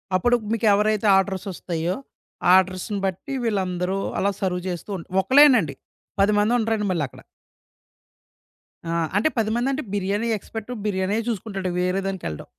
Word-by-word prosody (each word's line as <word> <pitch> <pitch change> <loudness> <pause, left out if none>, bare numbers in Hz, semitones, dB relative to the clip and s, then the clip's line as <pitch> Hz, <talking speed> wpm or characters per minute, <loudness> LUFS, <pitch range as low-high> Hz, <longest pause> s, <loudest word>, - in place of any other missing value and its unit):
అప్పుడు 240 +7 +3 0.2
మీకెవరైతే 215 -1 +2
ఆర్డర్స్ 190 -1 -1
వస్తాయో, 175 0 -3 0.6
ఆర్డర్స్‌ని 190 +2 +1
బట్టి 195 +9 -4
వీళ్ళందరూ 190 -4 -1 0.2
అలా 200 - +2
సర్వ్ 180 -2 -1
చేస్తూ 175 +3 -6
ఉంటా 165 - -11
ఒకళ్లేనండి. 255 - +5 0.5
10 200 +1 +4
మంది 210 +3 +2
ఉండరండి 220 -2 0
మళ్ళీ 170 -4 0
అక్కడ. - - -15 1.7
ఆ! - - -2 0.3
అంటే 220 +10 +3
10 220 -2 +1
మందంటే, 265 +4 0
బిర్యానీ 205 +3 -1
ఎక్స్పర్ట్ 225 +3 -8
బిర్యానీయే 200 +2 0
చూసుకుంటాడు 195 -4 -3
వేరే 180 +2 0
దానికేళ్ళడు. 180 - -5
195 Hz, 130 wpm, -23 LUFS, 185-220 Hz, 1.7 s, ఒకళ్లేనండి